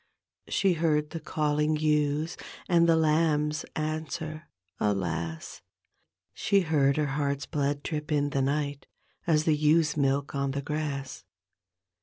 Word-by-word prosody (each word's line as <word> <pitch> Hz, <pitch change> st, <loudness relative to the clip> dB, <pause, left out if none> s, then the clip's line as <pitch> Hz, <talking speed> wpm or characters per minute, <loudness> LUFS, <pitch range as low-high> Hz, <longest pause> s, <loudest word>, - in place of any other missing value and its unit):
She 195 Hz, -2 st, +2 dB
heard 155 Hz, -2 st, +1 dB
the 165 Hz, -, -4 dB
calling 150 Hz, 0 st, 0 dB
ewes 150 Hz, +1 st, +1 dB, 0.3 s
And 170 Hz, -2 st, +4 dB
the 165 Hz, -, +6 dB
lambs 155 Hz, -1 st, +2 dB
answer 155 Hz, 0 st, -4 dB, 0.3 s
alas 85 Hz, -5 st, -2 dB
I -, -, -50 dB, 0.7 s
She 200 Hz, -1 st, +2 dB
heard 145 Hz, -5 st, +2 dB
her 150 Hz, -, +2 dB
heart's 140 Hz, 0 st, -1 dB
blood 145 Hz, -2 st, -1 dB
drip 150 Hz, -1 st, -4 dB
in 145 Hz, -1 st, +1 dB
die 140 Hz, -, 0 dB
ni^t. 145 Hz, +1 st, -1 dB, 0.4 s
As 155 Hz, -2 st, +3 dB
the 155 Hz, -1 st, +3 dB
ewes' 150 Hz, +1 st, +3 dB
milk 140 Hz, -1 st, 0 dB
on 140 Hz, -1 st, -1 dB
the 140 Hz, -, -3 dB
grass. 145 Hz, -5 st, -4 dB
150 Hz, 135 wpm, -28 LUFS, 140-155 Hz, 0.7 s, the